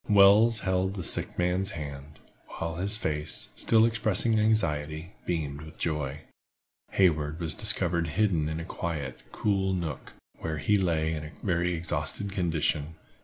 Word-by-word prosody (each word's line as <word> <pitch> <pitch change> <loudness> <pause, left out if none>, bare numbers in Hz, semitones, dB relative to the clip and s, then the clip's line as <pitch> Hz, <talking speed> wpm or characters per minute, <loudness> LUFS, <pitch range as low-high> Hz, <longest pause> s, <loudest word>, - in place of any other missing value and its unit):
Wells 105 +3 +6
held 95 +1 0
the 95 - -4
sick - - 0
man's 90 +3 0
hand, 70 -1 -8 0.4
while 80 0 -3
his 100 +4 +1
face, 75 -6 -2
still 110 -1 +4
expressing 110 0 +2
anxiety, 80 -6 0 0.2
beamed 75 -4 -2
with 80 0 -12
joy. 75 -3 -2 0.7
Hayward 80 -4 +2
was 80 -2 -1
discovered 90 -5 +3
hidden 85 -3 +1
in 80 0 -3
a 85 - -5
quiet, 75 -8 -4
cool 95 -2 0
nook, 85 -5 -4 0.3
where 80 -1 -3
he 75 +9 +2
lay 80 -5 +1
in 75 -1 -4
a 75 - -8
very 90 -2 +1
exhausted 90 +4 -3
condition. 80 -4 0
85 Hz, 145 wpm, -28 LUFS, 75-100 Hz, 0.7 s, Wells